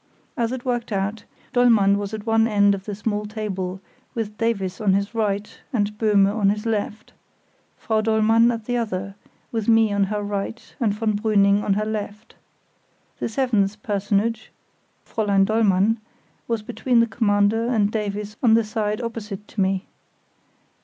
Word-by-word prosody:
As 235 -4 0
it 255 -1 -5
worked 240 -2 -2
out, 200 +2 -2 0.3
Dollmann 225 -5 +5
was 200 0 -4
at 215 -1 -6
one 225 0 +3
end 205 -2 +4
of 195 -1 -5
the 205 - -4
small 210 0 -2
table, 190 -4 -4 0.4
with 215 -2 -3
Davies 200 -4 -1
on 200 -3 +3
his 200 +3 0
right 210 -2 -2
and 210 -3 0
Böhme 205 -2 +3
on 205 -3 +3
his 210 +2 -2
left; 215 -1 -3 0.6
Frau 220 -1 0
Dollmann 225 +1 +4
at 230 -2 -5
the 245 - -1
other, 195 -4 -3 0.4
with 225 -3 -2
me 225 -2 +4
on 200 -1 +2
her 210 +1 -3
right 205 +3 -5
and 225 -4 +2
von 215 0 -1
Brüning 205 -2 +3
on 200 -1 +1
her 210 +1 0
left. 215 0 -5 0.9
The - - -2
seventh 215 -4 0
personage, 210 +2 -1 0.6
Fräulein 200 -3 +2
Dollmann, 215 0 +2 0.5
was 230 -2 -1
between 240 +2 +1
the 230 - +5
Commander 215 0 +1
and 215 -4 +2
Davies 210 0 -3
on 225 -3 +5
the 230 - +3
side 215 0 -2
opposite 220 -3 -6
to 205 - -3
me. 190 +1 0
210 Hz, 160 wpm, -23 LUFS, 200-225 Hz, 0.9 s, Dollmann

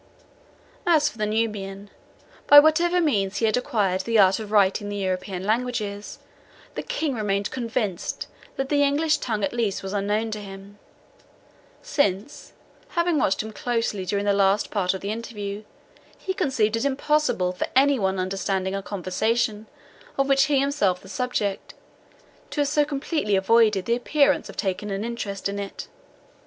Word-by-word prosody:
As 305 -3 +4
for 230 - -16
the 210 - 0
Nubian, 205 -2 -3 0.6
by 290 - +11
whatever 335 +4 +3
means 205 - +1
he 225 - +1
had 215 - +2
acquired 205 -7 0
the 230 +4 0
art 190 -1 +5
of 215 -1 -7
writing 205 0 +3
the 205 - -4
European 185 -1 -3
languages, 215 -2 -2 0.6
the - - -4
King 320 - -2
remained 205 -3 -1
convinced 225 -7 -3 0.3
that 270 0 -3
the 290 -1 +2
English 300 +2 +2
tongue 215 -4 -2
at 195 - -1
least 225 -6 -1
was 195 +1 -5
unknown 210 +2 -1
to 215 - -4
him, 195 +1 -11 1.0
since, 285 - -1 0.4
having 340 -3 +1
watched 195 - +1
him 220 - -7
closely 230 -4 -2
during 200 +2 -1
the 200 - +3
last 200 +1 +2
part 190 -3 0
of 190 - -6
the 200 - -3
interview, 210 -3 -5 0.6
he 380 - -3
conceived 265 - +1
it 230 - -1
impossible 280 -8 +1
for 180 - -3
any 275 0 +4
one 190 -1 0
understanding 190 0 -1
a 195 - -2
conversation, 210 +3 -1 0.5
of 275 0 +2
which 275 0 +4
he 290 - +1
was 270 - +4
himself 275 -11 +1
the 190 - -15
subject, 205 -2 -2 0.7
to 295 - -1
have 290 - +1
so 295 +1 +3
completely 285 - -1
avoided 210 0 +3
the 235 - +2
appearance 285 +3 +2
of - - -11
taking 195 +1 -2
an 195 +1 -3
interest 210 -5 -4
in 200 0 -4
it. 200 -1 -6
215 Hz, 165 wpm, -24 LUFS, 195-270 Hz, 1.0 s, by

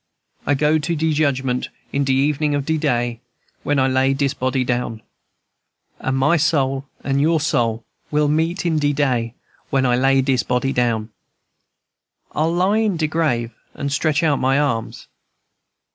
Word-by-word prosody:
I 145 - +3
go 150 +3 +2
to 165 +3 -2
de 160 0 0
judgment 135 -4 0 0.2
in 140 - +1
de 135 - 0 0.2
evenin' 150 0 0
of 140 -1 -2
de 160 - 0
day, 120 -3 0 0.4
When 145 - 0
I 130 -1 +3
lay 135 +1 +2
dis 140 0 0
body 130 0 -1
down; 120 -3 -2 1.0
And 130 0 -1
my 150 +6 +3
soul 140 -4 +1 0.2
and 140 0 0
your 160 +2 +3
soul 115 -7 0 0.2
will 150 0 +2
meet 165 +5 0
in 160 -3 +1
de 145 0 +1
day 125 -5 0 0.3
When 135 -1 +1
I 125 -1 +3
lay 135 +1 +3
dis 130 -2 +2
body 125 +2 -1
down." 115 -3 0 1.2
"I'll 160 +2 0
lie 185 +5 +2
in 210 -5 +1
de 160 - 0
grave 150 -8 0 0.2
and 140 -1 -3
stretch 155 +2 +1
out 150 -3 +2
my 135 +1 +2
arms." 120 -6 -2
140 Hz, 165 wpm, -20 LUFS, 130-155 Hz, 1.2 s, I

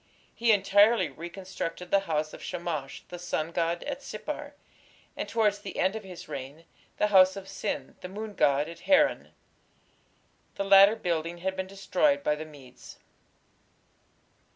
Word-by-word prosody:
He 230 -1 +2
entirely 205 -1 +4
reconstructed 175 +2 -6
the 200 - +5
house 155 0 -1
of - - -10
Shamash, 160 -6 -5
the 175 - -7
sun 165 -2 -2
god, 170 0 -1
at 280 -1 -5
Sippar, 290 +6 -6 0.6
and, - - -4
towards 210 -3 +2
the 195 - -8
end 190 +3 +1
of 220 - -5
his 185 -3 -10
reign, 145 +2 -8 0.3
the 210 - +2
house 190 -2 +6
of 195 -1 -8
Sin, 195 - -4
the 180 - -7
moon 210 +2 -6
god, 145 -4 +2
at 170 0 -10
Haran. 285 - +3 1.2
The 200 - -2
latter 195 +2 +8
building 170 -4 -2
had 190 0 0
been 190 0 -3
destroyed 280 +9 +1
by - - +2
the 155 +1 -5
Medes. 135 -5 -14
185 Hz, 150 wpm, -28 LUFS, 165-205 Hz, 1.2 s, latter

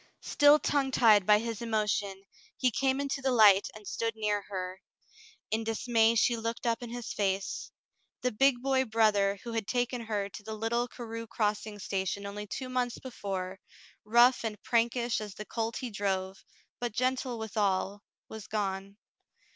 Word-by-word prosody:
'* - - -40
Still 290 0 +5
tongue 285 -2 0
tied 215 -7 +5
by 210 0 +7
his 230 0 -4
emotion, 210 -3 -1 0.3
he 255 -1 +2
came 265 +3 +1
into 280 0 -2
the 265 - +1
light 210 -5 +6
and 215 -1 -12
stood 230 -1 -2
near 210 -1 0
her. 185 -1 -5 0.7
In 220 +1 0
dismay 225 0 +2
she 235 +2 +3
looked 230 +1 -4
up 230 0 0
in 240 - -6
his 240 -1 -5
face. 195 -1 -2 0.5
The 250 - 0
big 250 +2 +3
boy 265 -1 +2
brother 210 -3 +2
who 235 - -6
had 225 -3 -2
taken 245 0 -1
her 205 -2 -1
to 200 - -10
the 220 +1 -6
little 235 +3 -1
Carew 230 -2 -7
Crossing 210 -1 -2
station 195 0 -3
only 205 +1 -6
two 255 +5 -5
months 250 -1 -1
before, 195 -6 -5 0.4
rough 240 +4 +5
and 220 -2 -3
prankish 235 0 +1
as 210 -2 -7
the 215 - -7
colt 225 0 -3
he 250 -2 -5
drove, 195 -1 -2 0.4
but 240 -3 -3
gentle 255 +1 -1
withal, 205 -2 -1 0.3
was 220 -4 -9
gone. 195 -1 -3
220 Hz, 170 wpm, -30 LUFS, 205-240 Hz, 0.7 s, by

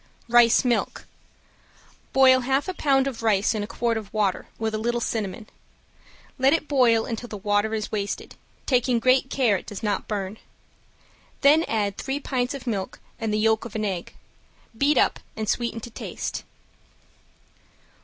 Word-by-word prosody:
~RICE 240 +1 +5
MILK~ 240 -2 0 1.1
Boil 260 -1 +6
half 265 +3 0
pound 270 -4 +2
of 265 -4 -4
rice 210 -2 +2
in 215 - -2
a 205 - -4
quart 230 0 -1
of 210 -2 -7
water, 205 -4 0
with 220 -1 -2
a 215 - -1
little 240 +2 0
cinnamon. 215 -3 -3 0.9
Let 265 +2 +4
it 325 -2 0
boil 235 -5 +3
until 235 +1 -5
the 210 - -6
water 205 +2 0
is 215 -1 -4
wasted, 205 -1 -3 0.3
taking 250 -2 +2
great 255 +2 +3
care 240 -8 +2
it - - -11
does 205 0 -7
not 210 -1 -1
burn. 205 0 -4 1.0
Then 300 +3 +6
add 205 -3 -1
three 270 +1 -2
pints 255 -1 -2
of 270 - -8
milk 200 -6 -3 0.2
and 225 -1 -2
the 210 - +1
yolk 220 0 +2
of 230 -2 -9
an 215 -1 -1
egg. 185 -4 -4 0.6
Beat 280 +4 +2
up - - +3 0.2
and 215 -1 -3
sweeten 235 +1 -1
to 235 - -9
taste. - - -5
230 Hz, 165 wpm, -24 LUFS, 215-255 Hz, 1.1 s, Boil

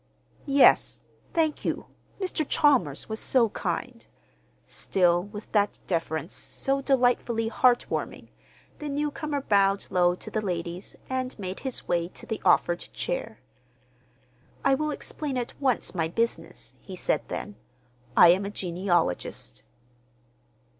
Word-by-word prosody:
"Yes, 275 0 +5 0.3
thank 315 -2 +1
you. - - -2 0.3
Mr. 370 -4 -1
Chalmers 250 - +3
was 220 0 -3
so 240 -4 +3
kind." - - -4 0.6
Still 175 -2 +2
with 205 +1 -9
that 205 -1 +2
deference 165 -2 -2
so 275 0 -2
delightfully 245 -4 +2
heart 245 +1 +3
warming, - - -4 0.5
the 300 - -4
newcomer 295 0 -2
bowed 200 -4 +3
low 180 -1 +3
to - - -9
the 215 - -1
ladies, 175 -2 -4
and 260 0 -3
made 190 -2 -5
his 265 -2 -5
way 170 -1 +1
to - - -8
the 220 - -4
offered 175 0 +4
chair. - - -4 1.2
"I 275 - +5
will 305 +3 0
explain 295 -2 -4
at 240 -1 -3
once 260 -4 +1
my 165 -3 0
business," 230 +8 -3
he - - -9
said - - 0
then. 210 - -5 0.6
"I 175 - +9
am 185 +3 +4
a 200 - -3
genealogist." 175 - -1
220 Hz, 130 wpm, -27 LUFS, 180-275 Hz, 1.2 s, I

